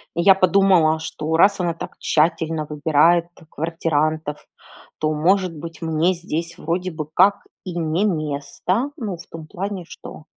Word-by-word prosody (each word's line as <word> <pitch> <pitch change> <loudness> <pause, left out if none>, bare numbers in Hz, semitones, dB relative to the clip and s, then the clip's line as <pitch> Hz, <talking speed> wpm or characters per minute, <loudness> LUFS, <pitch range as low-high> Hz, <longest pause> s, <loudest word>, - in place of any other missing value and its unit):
И 170 - +1
я 190 +2 +7
подумала, 185 -4 +4
что 160 0 -3
раз 200 +3 +4
она 175 -2 0
так 165 - -9
тщательно 160 0 +1
выбирает 160 +3 +3 0.2
квартирантов, 155 -2 -2 0.5
то, 155 0 0
может 180 +3 +1
быть, 165 +2 -9
мне 160 +2 +1
здесь 170 -1 -5
вроде 180 +3 -2
бы 155 -2 -6
как 200 +4 +4 0.2
и 180 -2 -5
не 165 +4 0
место. 165 - -2
Ну, 205 -7 -4
в 175 - -13
том 160 -1 -10
плане, 190 +1 -5
что - - -11
165 Hz, 150 wpm, -21 LUFS, 155-185 Hz, 0.5 s, я